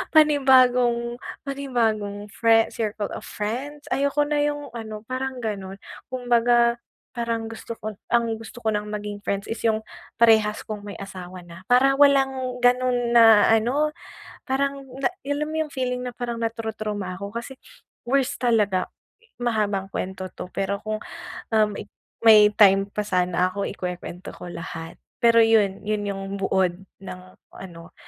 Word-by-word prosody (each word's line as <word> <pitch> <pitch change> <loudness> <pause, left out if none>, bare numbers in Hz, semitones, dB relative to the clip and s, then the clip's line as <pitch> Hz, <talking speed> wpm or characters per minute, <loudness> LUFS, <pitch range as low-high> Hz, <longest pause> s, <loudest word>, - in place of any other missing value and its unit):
panibagong 250 -5 +4 0.3
panibagong 220 -7 -1
friend, 225 -1 +3
circle 210 -2 -3
of - - -7
friends. 265 +8 -4
Ayoko 280 +2 +2
na 295 0 0
yung 290 0 -2
ano 220 -2 -6
parang 260 0 -3
ganon 195 -3 -4 0.4
kumbaga 240 -1 +3 0.4
parang 230 -2 -2
gusto 225 0 -8
ko 215 0 -5 0.2
ang 235 0 +3 0.2
gusto 225 +2 -11
ko 220 -1 +1
ng 210 0 -3
maging 210 -1 -5
friends 200 -1 -2
is 225 - -5
yung 220 -1 +2 0.4
parehas 220 -2 +4
kung 210 -1 -6
may 205 - -7
asawa 185 -2 -8
na, 170 +2 -12
para 265 +2 +5
walang 270 -3 +3
ganon 245 -1 +2
na 225 -3 +7
ano 275 +8 +1 0.5
parang 275 0 -1 0.2
na 325 - +2 0.2
alam 285 +2 -1
mo 315 - -5
yung 300 - -14
feeling 250 -1 -2
na 245 - -5
parang 240 -1 -4
natu-trauma 215 -4 -3
ako 200 +2 -7
kasi 250 +3 -6 0.5
worst 275 +2 +1
talaga. 210 -6 +2 0.5
Mahabang 210 -5 0
kwento 190 -1 -5
'to, - - -7
pero 195 +1 -1
kung, 215 0 -3 0.5
um, 215 -1 +4 0.6
may 210 -2 +8
time 195 -1 +5
pa 210 0 -3
sana 180 -1 +1
ako 200 0 -2
ikwekwento 180 -1 -6
ko 175 - -9
lahat. 165 -1 -7 0.2
Pero 230 -1 +5
yun, 215 -4 +3
yun 210 -1 -1
yung 195 0 -4 0.2
buod 185 -1 +1 0.2
ng 185 -1 -8 0.3
ano 170 -3 -11
225 Hz, 145 wpm, -24 LUFS, 200-250 Hz, 0.6 s, may